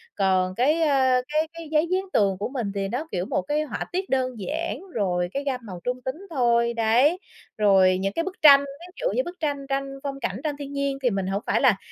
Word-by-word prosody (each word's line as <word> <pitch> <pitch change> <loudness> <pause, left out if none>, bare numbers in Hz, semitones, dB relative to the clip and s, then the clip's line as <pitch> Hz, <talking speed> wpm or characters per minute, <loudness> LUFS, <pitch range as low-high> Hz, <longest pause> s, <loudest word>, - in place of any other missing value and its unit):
Còn 185 -2 +1
cái, 295 +8 +2
a, 265 -4 +3
cái 310 +2 0
cái 330 -2 -9
giấy 310 +2 +2
dán 375 +1 +1
tường 195 -2 +2
của 205 - -2
mình 245 -7 -3
thì 195 -1 -1
nó, 255 +10 -3
kiểu, 180 0 -2
một - - -1
cái 295 +10 -1
họa 305 - -4
tiết 375 +2 -3
đơn 255 -3 -1
giản, 320 - -3
rồi 180 -4 0
cái 280 - -2
gam 270 -3 -2
màu 185 -4 -8
trung 250 0 -2
tính 260 - -2
thôi, 235 -5 +2
đấy, 235 +9 +3 0.4
rồi 190 -3 +4
những 195 +1 -2
cái 330 - -1
bức 375 +1 -5
tranh. 280 -2 +9
Ví 285 +6 -10
dụ - - +1
như - - +2
bức 355 -3 -9
tranh 285 -3 -2
tranh 275 0 -3
phong 275 -1 -4
cảnh, - - -3
tranh 295 -2 -2
thiên 285 -1 -7
nhiên, 280 -1 -1
thì 250 - +4
mình 195 -3 -2
hổng 195 +2 -1
phải - - +2
là 250 -8 +4
265 Hz, 240 wpm, -24 LUFS, 205-300 Hz, 0.4 s, tranh